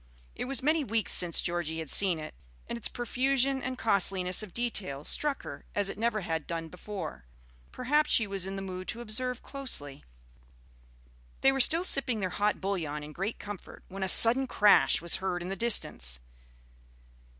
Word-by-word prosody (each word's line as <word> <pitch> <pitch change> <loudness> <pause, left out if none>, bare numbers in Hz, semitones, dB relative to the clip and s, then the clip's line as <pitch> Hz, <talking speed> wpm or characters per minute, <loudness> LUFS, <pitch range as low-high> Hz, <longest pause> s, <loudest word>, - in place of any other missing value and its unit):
It - - -6
was 265 0 -1
many 310 +2 +1
weeks 225 -5 -1
since 175 -2 +4
Georgie 170 -2 -3
had 160 -3 -5
seen 190 -4 +5
it, 155 0 -9 0.3
and - - -5
its 235 - 0
profusion 265 +2 -1
and 255 0 -5
costliness 190 -4 +2
of 215 -4 -7
detail 200 - -2
struck 290 - -2
her - - -9
as 205 -1 0
it - - -11
never 225 -2 -1
had 160 -3 -4
done 165 -1 -5
before. 180 - -8 0.5
Perhaps 295 +4 0
she 225 - +4
was 195 -2 -2
in 195 - -6
the 195 - -6
mood 185 -1 -7
to 235 - -6
observe 245 +2 -2
closely. 145 - -3 1.4
They 270 - +4
were 270 - -3
still 330 +7 +4
sipping 265 -9 +4
their 185 -2 -3
hot 205 +3 -1
bouillon 165 -7 -4
in 150 - -10
great 195 +7 -4
comfort, 205 -2 -10
when 195 +1 -9
a 190 - -1
sudden 245 +7 +7
crash 205 -6 +3
was 170 - +1
heard 180 -2 -4
in 180 - -6
the 195 - -4
distance. 65 - +1
200 Hz, 180 wpm, -28 LUFS, 175-245 Hz, 1.4 s, sudden